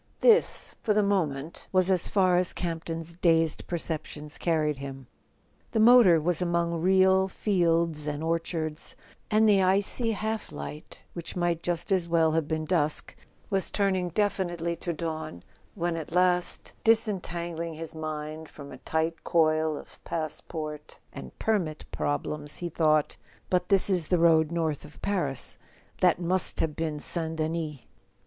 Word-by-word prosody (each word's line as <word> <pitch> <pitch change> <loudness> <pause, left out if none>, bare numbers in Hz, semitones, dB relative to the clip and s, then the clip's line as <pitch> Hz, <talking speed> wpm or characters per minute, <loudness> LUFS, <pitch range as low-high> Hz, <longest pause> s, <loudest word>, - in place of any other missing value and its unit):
This, 460 -2 +4
for 210 - +1
the 210 - +4
moment, 165 -7 -1
was 185 0 +3
as 180 -3 +3
far 185 -3 +3
as 180 0 +1
Camp 165 -2 -4
ton's 165 0 -5
dazed 165 -2 +1
per¬ 175 - -2
ceptions 150 -2 -5
carried 155 -4 0
him... 135 -1 -7 0.7
The 225 - +2
motor 220 -7 +7
was 170 +2 0
among 170 -1 0
real 190 +1 +4
fields 170 -6 +1
and 150 +1 -3
orchards, 165 -1 -3 0.3
and 220 0 +4
the 200 -2 +5
icy 200 +5 +2
half 220 +1 -3
light 75 +1 -8
which 170 -1 -6
might 175 -2 0
just 175 +3 -2
as 185 -3 +2
well 165 -1 +3
have 160 -1 0
been 155 0 -2
dusk 155 -3 0 0.4
was 195 -1 0
turning 190 -3 0
definitely 175 -3 -1
to 170 - -3
dawn, 155 - -5 0.3
when 175 -3 -1
at 160 -2 -6
last, 180 0 +1
disentangling 175 -7 0
his 165 +1 -7
mind 155 0 -5
from 140 -1 -11
a - - -10
tight 160 +1 -2
coil 155 -2 +2
of - - -13
passport 155 -1 -5 0.2
and 65 -2 -9
permit 180 -9 -1
problems, 145 0 -2
he 175 - -4
thought: 155 -2 +2 0.3
"But 180 -1 +1
this 195 -1 +5
is 180 -5 +1
the 180 - +2
road 165 -2 +4
north 160 -4 -1
of 150 - -14
Paris—that 175 0 -1
must 180 +1 0
have 155 -2 0
been 155 -2 -2
St. 160 +1 -2
Denis." 155 -3 -3
165 Hz, 150 wpm, -27 LUFS, 155-185 Hz, 0.7 s, motor